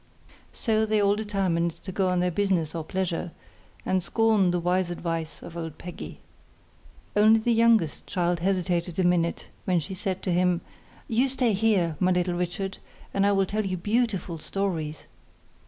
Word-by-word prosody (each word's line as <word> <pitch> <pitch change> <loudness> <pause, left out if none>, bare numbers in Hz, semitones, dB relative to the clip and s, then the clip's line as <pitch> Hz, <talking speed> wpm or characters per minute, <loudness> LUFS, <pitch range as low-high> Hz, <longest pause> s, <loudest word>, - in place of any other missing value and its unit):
So 220 -2 +1
they 215 -1 +2
all 200 0 +3
determined 195 -5 0
to 190 - -5
go 190 0 +1
on 180 -1 +1
their 180 0 +1
business 180 -4 0
or 165 -2 -3
pleasure, 180 -1 -2 0.5
and 185 0 +1
scorned 215 -1 +3
the 175 - 0
wise 180 +1 +1
advice 165 -2 -4
of 170 - -9
old 165 -2 -5
Peggy. 175 -1 -8 1.0
Only 215 +2 +6
the 235 +2 +1
youngest 225 -8 +3
child 175 -2 0
hesitated 180 -2 0
a 190 - +2
minute, 175 -1 +1 0.2
when 180 -2 +2
she 165 +4 -6
said 190 0 -3
to 185 - 0
him, 180 0 +2 0.5
'You 245 +3 +2
stay 255 -4 +1
here, 190 -6 +2
my 185 - +3
little 180 0 +1
Richard, 180 +2 -3 0.3
and 200 0 +3
I - - +4
will 195 -1 +3
tell 215 +3 -1
you 185 -2 -2
beautiful 205 -4 -1
stories. 160 -4 -3
185 Hz, 170 wpm, -26 LUFS, 175-205 Hz, 1.0 s, Only